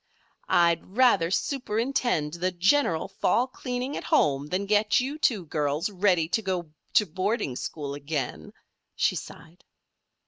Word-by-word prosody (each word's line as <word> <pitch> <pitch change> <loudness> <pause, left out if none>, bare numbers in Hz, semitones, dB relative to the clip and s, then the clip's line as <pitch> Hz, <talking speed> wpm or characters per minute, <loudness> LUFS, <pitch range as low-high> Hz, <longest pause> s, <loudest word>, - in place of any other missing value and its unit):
"I'd 170 +4 +2
rather 220 -10 +4
superintend 230 - -1
the 175 +2 -1
general 185 - +2
fall 245 - +1
cleaning 255 +1 -4
at - - -5
home 140 0 +2
than 185 +5 -2
get 210 +1 +3
you 275 +5 -3
two 210 - +1
girls 150 +4 -1
ready 180 -4 +2
to 225 - +1
go 180 -6 -3 0.2
to 210 - +5
boarding 190 - -2
school 140 +1 -5
again," 145 -2 -4 0.4
she - - +1
sighed. 170 +3 -10
185 Hz, 135 wpm, -26 LUFS, 160-230 Hz, 0.4 s, to